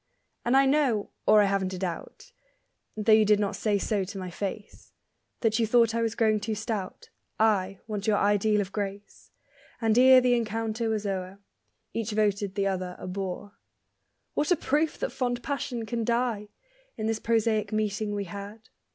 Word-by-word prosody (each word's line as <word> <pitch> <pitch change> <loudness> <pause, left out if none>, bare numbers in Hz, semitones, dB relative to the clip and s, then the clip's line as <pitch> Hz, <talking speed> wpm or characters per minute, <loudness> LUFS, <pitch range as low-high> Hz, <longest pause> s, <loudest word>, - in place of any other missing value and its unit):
And 245 +3 +3
I 275 - +5
know 270 -7 +1 0.2
(or 210 -1 +7
I - - +3
haven't 195 -1 0
a - - -6
doubt) 185 - -6 0.7
Though 215 +1 +2
you 215 0 +7
did 210 0 +4
not 205 -1 -1
say 210 -2 +1
so 200 0 0
to 195 +2 -7
my 185 -2 -5
face, 200 +3 -6 0.5
That 225 0 +2
you 225 - +2
thought 230 0 +4
I 230 - 0
was 225 -1 -1
growing 215 -2 +2
too 215 +1 -3
stout: 210 -3 -5 0.3
I, 195 -3 +1
once 210 -2 -4
your 210 -1 +3
ideal 205 +1 +2
of 195 -1 -5
grace. 200 0 -6 0.5
And 225 -2 +2
ere 260 0 +8
the 250 -1 +3
encounter 225 0 -1
was 215 -1 -1
o'er 190 -1 -3 0.6
Each 225 -1 -2
voted 205 -2 0
the 200 - 0
other 185 -2 -2
a - - -9
bore. 195 +2 -5 0.7
What 295 - 0
a 355 - +5
proof 305 +1 0
that - - -3
fond 245 -1 -2
passion 260 -5 -3
can 230 +1 -2
die, 235 -3 -1 0.5
In 215 - -3
this 225 0 0
prosaic 220 -2 +1
meeting 215 -1 -1
we 200 - -2
had! 200 +4 -9
215 Hz, 180 wpm, -27 LUFS, 200-230 Hz, 0.7 s, ere